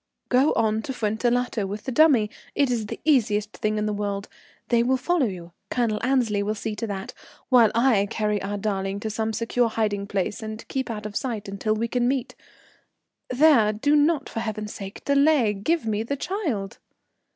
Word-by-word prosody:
"Go 260 Hz, +4 st, +4 dB
on 220 Hz, -1 st, +1 dB
to 265 Hz, -, -5 dB
Fuentellato 235 Hz, -1 st, 0 dB
with 205 Hz, +2 st, -6 dB
the 265 Hz, -, -4 dB
dummy. 255 Hz, -7 st, +4 dB, 0.2 s
It 280 Hz, -3 st, +2 dB
is 225 Hz, -3 st, -1 dB
the -, -, -6 dB
easiest 215 Hz, -8 st, +2 dB
thing 215 Hz, 0 st, -1 dB
in 210 Hz, -, 0 dB
the 210 Hz, -, -1 dB
world. 200 Hz, -1 st, -3 dB, 0.4 s
They 235 Hz, -1 st, +4 dB
will 260 Hz, +2 st, +2 dB
follow 330 Hz, -1 st, +1 dB
you, 175 Hz, -4 st, -7 dB, 0.2 s
Colonel 230 Hz, -4 st, 0 dB
Annesley 240 Hz, -6 st, +1 dB
will 210 Hz, +2 st, -1 dB
see 215 Hz, 0 st, -4 dB
to 230 Hz, -, -3 dB
that, 195 Hz, -2 st, -5 dB, 0.4 s
while 240 Hz, -5 st, +6 dB
I 230 Hz, -4 st, +3 dB
carry 210 Hz, -1 st, -1 dB
our 205 Hz, +1 st, -3 dB
darling 195 Hz, -1 st, -2 dB
to 220 Hz, -, -3 dB
some 220 Hz, +1 st, -1 dB
secure 230 Hz, +2 st, 0 dB
hiding 210 Hz, -3 st, -1 dB
place 200 Hz, +1 st, -2 dB
and 220 Hz, 0 st, -7 dB
keep 265 Hz, -2 st, -3 dB
out 215 Hz, -2 st, -5 dB
of 210 Hz, -1 st, -6 dB
sight 225 Hz, -6 st, -3 dB
until 200 Hz, +2 st, -1 dB
we 230 Hz, +2 st, -1 dB
can 245 Hz, +1 st, 0 dB
meet. 260 Hz, -1 st, -1 dB, 1.0 s
There, 255 Hz, -5 st, +5 dB
do 280 Hz, +8 st, +1 dB
not, 295 Hz, -1 st, +2 dB
for -, -, -5 dB
heaven's 215 Hz, -2 st, -4 dB
sake, 195 Hz, 0 st, -9 dB
delay. 280 Hz, -5 st, +4 dB
Give 305 Hz, +10 st, -1 dB
me 215 Hz, -1 st, 0 dB
the 280 Hz, +5 st, -3 dB
child." 270 Hz, -, -3 dB
220 Hz, 190 wpm, -24 LUFS, 210-255 Hz, 1.0 s, while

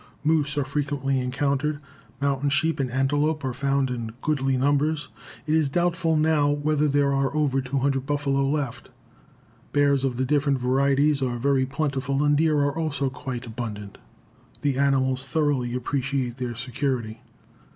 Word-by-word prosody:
Moose 150 Hz, -2 st, +1 dB
are 145 Hz, -, +1 dB
frequently 140 Hz, -2 st, -1 dB
encountered. 140 Hz, +3 st, -1 dB, 0.4 s
Mountain 140 Hz, 0 st, 0 dB
sheep 160 Hz, +2 st, +1 dB
and 135 Hz, -2 st, 0 dB
antelope 145 Hz, +4 st, 0 dB
are 130 Hz, -, -2 dB
found 135 Hz, 0 st, 0 dB
in 115 Hz, -2 st, -4 dB
goodly 135 Hz, -3 st, +1 dB
numbers. 145 Hz, +2 st, +1 dB, 0.4 s
It 155 Hz, -, 0 dB
is 155 Hz, -3 st, +3 dB
doubtful 170 Hz, +1 st, +1 dB
now 155 Hz, -1 st, +3 dB
whether 150 Hz, +1 st, +1 dB
there 140 Hz, -1 st, +2 dB
are 135 Hz, 0 st, +1 dB
over 140 Hz, -3 st, +1 dB
200 135 Hz, 0 st, 0 dB
buffalo 140 Hz, -2 st, +1 dB
left. 145 Hz, -4 st, -3 dB, 0.8 s
Bears 140 Hz, -2 st, +3 dB
of 130 Hz, -3 st, -1 dB
the 130 Hz, -, 0 dB
different 140 Hz, 0 st, +2 dB
varieties 140 Hz, +3 st, +2 dB
are 125 Hz, -2 st, -1 dB
very 130 Hz, +1 st, +1 dB
plentiful 140 Hz, -1 st, -1 dB
and 145 Hz, 0 st, +3 dB
deer 155 Hz, 0 st, +3 dB
are 140 Hz, 0 st, 0 dB
also 140 Hz, -4 st, -1 dB
quite 130 Hz, -2 st, -6 dB
abundant. 110 Hz, -4 st, -6 dB, 0.6 s
The 140 Hz, -2 st, 0 dB
animals 130 Hz, -2 st, +2 dB
thoroughly 135 Hz, -3 st, 0 dB
appreciate 130 Hz, -1 st, -2 dB
their 125 Hz, -2 st, -4 dB
security. 125 Hz, -3 st, -3 dB
140 Hz, 150 wpm, -25 LUFS, 130-145 Hz, 0.8 s, is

